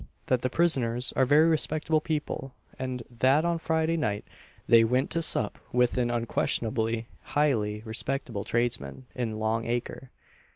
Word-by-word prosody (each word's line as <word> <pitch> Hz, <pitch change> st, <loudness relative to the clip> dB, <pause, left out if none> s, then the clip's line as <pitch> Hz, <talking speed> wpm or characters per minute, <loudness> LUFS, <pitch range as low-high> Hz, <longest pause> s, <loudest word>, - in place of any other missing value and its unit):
_, -, -, -10 dB, 0.2 s
that 130 Hz, -2 st, +1 dB
the 130 Hz, -, 0 dB
prisoners 125 Hz, -6 st, +1 dB
are 130 Hz, -, +4 dB
very 150 Hz, +4 st, +6 dB
respectable 155 Hz, -1 st, +1 dB
people, 150 Hz, -4 st, -3 dB, 0.2 s
and 130 Hz, -2 st, -4 dB
that 130 Hz, +6 st, +3 dB
on 170 Hz, -1 st, 0 dB
Friday 160 Hz, 0 st, 0 dB
night 105 Hz, -10 st, -1 dB, 0.4 s
they 115 Hz, -1 st, +7 dB
went 125 Hz, +4 st, +1 dB
to 165 Hz, -, 0 dB
sup 105 Hz, -9 st, +1 dB
with 125 Hz, -1 st, +2 dB
an 120 Hz, -1 st, +1 dB
unquestionably 115 Hz, -1 st, -1 dB, 0.3 s
highly 110 Hz, -8 st, +1 dB
respectable 115 Hz, -1 st, -3 dB
tradesman 120 Hz, -, -2 dB
in 115 Hz, -4 st, -3 dB
Long 110 Hz, +1 st, -1 dB
acre. 120 Hz, +2 st, -3 dB
125 Hz, 150 wpm, -28 LUFS, 115-150 Hz, 0.4 s, they